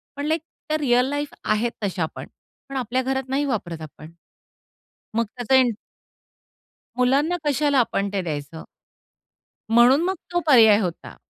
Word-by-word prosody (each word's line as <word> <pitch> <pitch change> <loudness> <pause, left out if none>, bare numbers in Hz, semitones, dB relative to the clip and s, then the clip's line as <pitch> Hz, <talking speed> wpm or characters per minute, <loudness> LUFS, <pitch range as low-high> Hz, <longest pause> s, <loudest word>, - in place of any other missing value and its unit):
पण 285 +1 -4
लाइक 320 +1 0 0.3
त्या 310 - +1
real 250 -3 +2
life 290 0 -3
आहेत 220 +3 0
तशा 185 -4 -1
पण. - - -8 0.4
पण 275 - -7
आपल्या 255 +1 -1
घरात 265 0 -2
नाही 280 +2 0
वापरत 175 - -3
आपण. 155 +1 -11 1.0
मग 230 +1 +2
त्याचा 245 +2 0
इन 255 -2 +5 1.3
मुलांना 280 +8 +2
कशाला 285 -1 +2
आपण 200 -4 0
ते 195 - 0
द्यायचं? 155 -1 -6 1.1
म्हणून 245 +6 +5
मग 380 +1 0 0.2
तो 350 - +1
पर्याय 220 -6 +7
होता. 180 -5 -5
250 Hz, 145 wpm, -23 LUFS, 205-285 Hz, 1.3 s, पर्याय